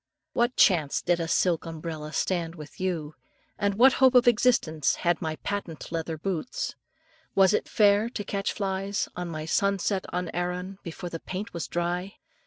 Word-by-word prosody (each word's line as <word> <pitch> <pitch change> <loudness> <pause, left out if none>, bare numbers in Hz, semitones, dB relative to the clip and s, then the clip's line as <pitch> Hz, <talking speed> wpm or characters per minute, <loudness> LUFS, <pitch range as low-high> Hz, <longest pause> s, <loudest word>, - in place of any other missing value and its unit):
What 240 +1 +1
chance 160 -7 +4
did 175 -1 +2
a 165 - -2
silk 170 0 +1
umbrella 160 -2 -6
stand 170 -1 -1
with 150 -3 -11
you? 170 -5 -2 0.5
What 210 +6 +5
hope 260 -1 +4
of 245 -1 +6
existence 215 - +3
had 175 -2 0
my 160 -1 -2
patent 180 -5 -5
leather 165 -1 -3
boots? 185 +6 -3 0.6
Was 195 0 +5
it - - 0
fair 205 +1 +4
to 210 - -5
catch 200 0 -2
flies 195 0 -2
on 180 0 -4
my 155 -1 -5
"Sunset 195 +2 0
on 180 -1 -2
Arran" 180 +2 -3
before 170 +1 -7
the 165 - -4
paint 190 +6 -6
was 170 - -4
dry? 175 +3 -2
180 Hz, 165 wpm, -27 LUFS, 165-200 Hz, 0.6 s, of